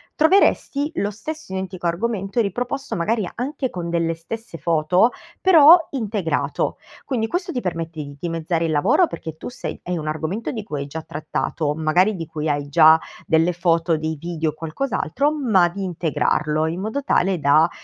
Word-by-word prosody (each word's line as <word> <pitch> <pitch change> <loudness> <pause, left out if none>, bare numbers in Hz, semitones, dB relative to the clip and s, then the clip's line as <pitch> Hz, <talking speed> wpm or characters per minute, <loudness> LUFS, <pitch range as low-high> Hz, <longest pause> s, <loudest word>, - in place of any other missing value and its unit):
troveresti 310 -3 +3
lo 205 +1 -1
stesso 305 +4 -7
identico 190 -2 -5
argomento 195 +4 -1
riproposto 245 +6 -3
magari 195 +2 0
anche 260 +1 -3
con 170 -2 -5
delle 165 -1 0
stesse 195 +3 -8
foto, 170 - +2 0.3
però 335 -3 +8
integrato. 210 - -1 0.3
Quindi, 230 -5 -1
questo 355 - -2
ti 250 - -2
permette 165 -3 -4
di 140 -1 -9
dimezzare 165 0 -1
il 160 - -1
lavoro 195 - +4
perché 160 -1 -7
tu - - -8
sei 250 - -6
hai 180 -1 -2
un 155 -1 -5
argomento 160 +8 -3
di 220 -3 -5
cui 150 -8 -5
hai 140 - -5
già 160 +3 -6
trattato, 150 0 -3
magari 175 +7 +2
di 165 -3 -5
cui 155 0 -3
hai 145 -1 -1
già 155 +3 +6 0.3
delle 165 +2 +3
foto, 165 -1 +1
dei 160 +1 -3
video 165 -2 -2
o - - -5
qualcos'altro, 195 - -1
ma 220 - +3
di 195 +2 -6
integrarlo 155 -3 0
in 170 +4 -3
modo 220 +7 -3
tale 190 -9 +1
da, 150 +3 +4
175 Hz, 170 wpm, -22 LUFS, 160-225 Hz, 0.3 s, però